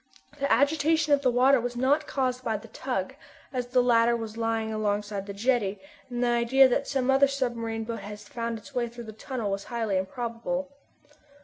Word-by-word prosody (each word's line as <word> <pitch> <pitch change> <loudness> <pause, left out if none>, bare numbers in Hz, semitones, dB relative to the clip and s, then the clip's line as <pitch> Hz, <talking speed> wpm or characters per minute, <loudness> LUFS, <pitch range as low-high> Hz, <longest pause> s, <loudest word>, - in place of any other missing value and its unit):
The 280 - 0
agitation 305 +3 +3
of 285 - +4
the 260 - +3
water 255 +1 +4
was 245 +1 -3
not 275 +5 +2
caused 255 -2 -1
by 225 -3 0
the 225 +2 -13
tug, 250 -4 -3 0.4
as 250 -1 -2
the 250 0 +3
latter 235 -1 +4
was 225 -1 -6
lying 225 -1 -1
alongside 205 -1 -2
the - - -4
jetty, 205 -2 0 0.3
and 245 0 -2
the - - +2
idea 240 +3 +5
that 245 - 0
some 265 -2 +1
other 275 +1 +5
submarine 235 -5 -2
boat 230 +1 -5
had 205 0 -8
found 230 +2 -4
its 245 +6 -14
way 245 -2 0
through 235 +1 -9
the 220 - -8
tunnel 225 -2 -4
was 195 0 -3
highly 225 -5 -1
improbable. 245 +6 -3
240 Hz, 195 wpm, -27 LUFS, 220-265 Hz, 0.4 s, idea